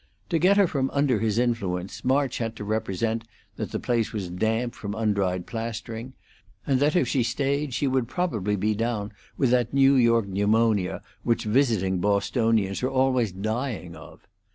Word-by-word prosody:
To 165 -2 +1
get 190 +4 +4
her 200 - +6
from 135 -5 -1
under 140 -5 +2
his 110 0 0
influence 100 -7 -1
March 135 +1 +1
had 115 -1 -3
to 105 - -7
represent 110 +1 -1 0.3
that - - -3
the - - -3
place 115 -3 0
was 95 -5 -4
damp 110 +6 -1
from 105 -1 -6
undried 100 -5 0
plastering, 115 +2 -5 0.5
and 135 -3 +2
that 145 +4 +2
if 155 -8 +3
she 130 - +1
stayed 135 +3 -1
she 140 - 0
would 130 -3 +1
probably 110 - -1
be 105 +2 0
down 110 -1 -2 0.3
with 130 -4 +2
that 125 0 +1
New 135 0 +6
York 115 -4 +3
pneumonia 105 0 +1 0.2
which 115 -1 0
visiting 105 -6 +1
Bostonians 100 +1 +1
are 130 - 0
always 130 -4 +2
dying 110 -2 -3
of. - - -14
115 Hz, 170 wpm, -25 LUFS, 105-130 Hz, 0.5 s, her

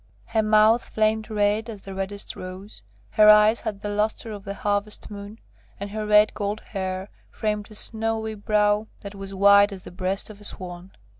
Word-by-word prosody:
Her 225 -1 0
mouth 215 +2 +4
flamed 220 0 0
red 210 +1 0
as 210 -4 -8
the 195 - -8
reddest 195 +1 -4
rose; 185 +3 -9 0.3
her 215 0 +6
eyes 210 +1 +6
had 210 -3 -5
the 205 - -4
lustre 215 +2 -1
of 205 -2 -8
the 200 - -5
harvest 205 +1 -2
moon, 205 +1 -9 0.4
and 200 0 -5
her 215 0 -4
red 210 0 +5
gold 205 +1 -3
hair 190 -1 -4 0.2
framed 210 -1 -3
a 215 - -10
snowy 220 0 -1
brow 210 0 +1
that 200 0 -8
was 195 -1 -8
white 200 +1 +6
as 190 -2 -8
the - - -10
breast 185 +4 -2
of 205 -1 -15
a - - -12
swan. 180 -2 -8
210 Hz, 190 wpm, -24 LUFS, 200-215 Hz, 0.4 s, her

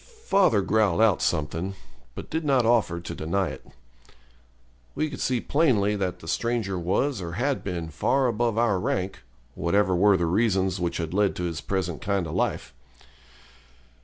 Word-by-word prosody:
Father 180 - +3
growled 105 -3 +2
out 110 -4 +4
something, 85 +4 -1 0.4
but - - -8
did 160 +1 -1
not 135 -5 +2
offer 110 -7 +2
to 85 0 -7
deny 90 +4 -1
it. 65 - -9 1.3
We 155 -1 -1
could 135 - -7
see 125 -2 +1
plainly 115 -9 +2
that 95 -3 -3
the 80 - -11
stranger 115 -3 -1
was 95 +7 0
or 85 -1 -5
had 130 +7 -1
been 85 -4 -4
far 135 - +1
above 115 -1 0
our 115 -5 +2
rank, 95 +1 -2 0.3
whatever 95 +4 +1
were 100 +2 +4
the 85 - 0
reasons 95 0 +1
which 85 -1 -2
had 85 -1 -4
led 100 0 +2
to 90 - -4
his 85 -2 -3
present 90 -4 -3
kind 100 -3 0
of 80 - -6
life. 65 - -2
100 Hz, 165 wpm, -25 LUFS, 85-115 Hz, 1.3 s, out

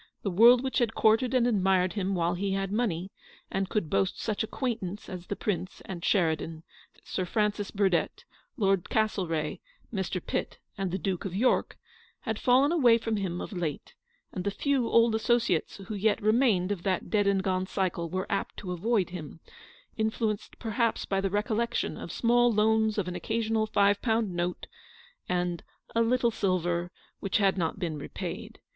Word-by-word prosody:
The 200 - -1
world 235 +7 +7
which 265 - 0
had 235 -2 0
courted 230 +4 +3
and 245 -2 +4
admired 190 -5 +2
him 195 -2 -1
while 170 0 +1
he 195 +2 -1
had 195 0 -2
money 195 -5 -1 0.4
and 195 0 -1
could 210 -7 -1
boast 100 -9 0
such 215 -2 -1
acquaintance 220 -5 -3
as 180 -2 -7
the 205 - -2
Prince 185 -3 -3
and 175 -3 -7
Sheridan, 160 -3 0 0.4
Sir 185 - -3
Francis 210 +2 0
Burdett, 195 -4 0 0.3
Lord 195 -5 +1
Castlereagh, 185 -8 0 0.4
Mr. 190 -2 -2
Pitt, - - -3 0.2
and 195 -1 -2
the 185 - -2
Duke 185 0 -2
of 185 -2 -4
York, 245 +6 +1 0.4
had - - -3
fallen 265 +4 +4
away 250 -9 +5
from 225 -1 -2
him 180 -3 -2
of - - -6
late; 170 -6 -4 0.4
and 180 - -4
the 200 - 0
few 260 +4 0
old 230 -1 +4
associates 225 -5 +1
who 200 +2 -7
yet 210 +2 +1
remained 215 -4 +3
of 195 -4 -2
that 185 -1 -1
dead 205 -2 +3
and 195 -1 +2
gone 185 -1 0
cycle 180 -4 -1
were 185 +3 -2
apt 195 - -2
to 185 - -5
avoid 195 +1 0
him, 165 -3 -8 0.6
influenced 220 -1 -1
perhaps 230 0 0
by 195 -1 0
the 195 - 0
recollection 215 +3 -1
of - - -7
small 240 +1 +3
loans 220 0 +2
of 195 -3 0
an 180 - -4
occasional 220 +1 0
five 200 -1 +3
pound 225 -5 +1
note, 175 +1 -2 0.6
and 175 -2 -1 0.3
"a 230 - +2
little 235 +1 +2
silver," 175 -4 0 0.3
which 195 - 0
had 195 -2 +3
not 170 -2 -1
been 165 -6 -3
repaid. - - -6
200 Hz, 175 wpm, -28 LUFS, 180-225 Hz, 0.6 s, world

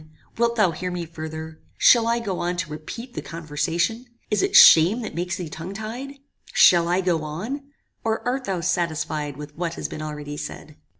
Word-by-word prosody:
wilt 235 0 +1
thou 210 -6 +3
hear 180 +3 -4
me 180 -1 -4
further? 160 0 -8 0.2
Shall 230 -2 +6
I 235 0 +2
go 205 -6 -3
on 175 +1 -2
to 170 -3 -3
repeat 230 +11 -8
the - - -4
conversation? 170 - -2 0.2
Is 210 -2 +2
it - - 0
shame 175 +9 +8
that - - -6
makes 175 +2 -2
thee 180 - -5
tongue 165 +5 -7
tied? 240 +6 -6 0.4
Shall 170 -1 +6
I 180 +2 +2
go 175 -4 +1
on? 215 - -5 0.4
or 225 +1 -1
art 260 +1 -1
thou 190 -3 -2
satisfied 155 -5 -1
with 150 0 -9
what 170 0 -3
has - - -4
been 155 - -7
already 150 -1 -6
said?" 155 - -8
175 Hz, 190 wpm, -23 LUFS, 155-220 Hz, 0.4 s, shame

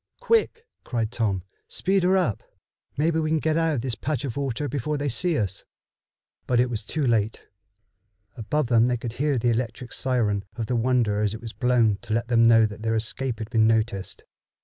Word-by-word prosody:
"Quick!" 455 0 +1 0.2
cried 115 -3 -2
Tom. 105 -7 -1 0.2
"Speed 195 +1 +1
her 185 +2 +3
up! 170 - 0 0.6
Maybe 160 +2 +1
we 155 -1 -1
can 160 - +2
get 155 0 0
out 165 -1 +1
of 120 - -2
this 125 -1 -2
patch 145 +3 -3
of 125 - -4
water 140 0 -2
before 145 +2 -2
they 145 0 -1
see 165 +7 +1
us." 100 -3 -2 0.8
But 125 -1 +2
it 125 0 +2
was 110 -3 -3
too 150 +6 -2
late. 110 -3 0 0.9
Above 130 +6 -1
them 120 -1 +4
they 125 -1 0
could 115 -1 -6
hear 145 +1 0
the 120 0 +1
electric 120 +1 -3
siren 110 -6 0
of 115 - -3
the 125 - -1
Wonder 115 -3 +1
as 105 0 0
it - - -8
was 115 -2 -7
blown 120 -5 +2
to 110 - -2
let 115 +1 -2
them 115 -1 +5
know 115 -1 +6
that 105 0 -6
their 110 0 0
escape 120 +2 -1
had 110 +1 -7
been 110 -2 +4
noticed. 110 -3 -1
120 Hz, 205 wpm, -25 LUFS, 110-140 Hz, 0.9 s, know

